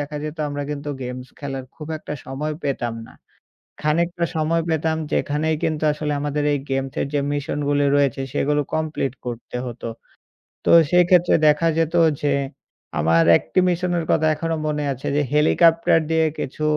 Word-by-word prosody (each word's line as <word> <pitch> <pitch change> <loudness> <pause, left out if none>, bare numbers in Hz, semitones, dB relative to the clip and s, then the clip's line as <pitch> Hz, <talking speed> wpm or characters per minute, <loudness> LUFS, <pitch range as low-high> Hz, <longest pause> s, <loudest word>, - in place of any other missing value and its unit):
দেখা 145 +1 -5
যেতো 155 +1 -5
আমরা 145 0 -4
কিন্তু 145 0 -5
গেমস 125 0 -6
খেলার 135 -2 -5
খুব 155 -1 -8
একটা 155 - -7
সময় 145 +4 -3
পেতাম 120 -4 -2
না। - - -15 0.7
খানিকটা 170 +3 +1
সময় 160 +2 +1
পেতাম 160 0 0 0.2
যেখানেই 155 +2 0
কিন্তু 155 -1 -1
আসলে 150 0 -2
আমাদের 145 0 -1
এই 145 - 0
গেমসের 135 0 -1
যে 145 - +2
মিশনগুলি 145 0 0
রয়েছে 140 -2 +2
সেগুলো 145 +1 +1
কমপ্লিট 155 -4 -1
করতে 120 0 -5
হতো। 120 -1 -7 0.8
তো - - +2 0.2
সেইক্ষেত্রে 180 0 +4
দেখা 150 +2 +3
যেতো 165 +1 +1 0.2
যে 145 - +2 0.7
আমার 80 +2 +4
১ - - -1
টি - - +4
মিশনের 175 -1 0
কথা 160 0 +3
এখনো 165 +1 -2
মনে 150 -1 -1
আছে 130 0 -8
যে - - +3
হেলিকপ্টার 165 +2 +4
দিয়ে 160 0 +3
কিছু 140 +3 -5
150 Hz, 155 wpm, -22 LUFS, 140-160 Hz, 0.8 s, সেইক্ষেত্রে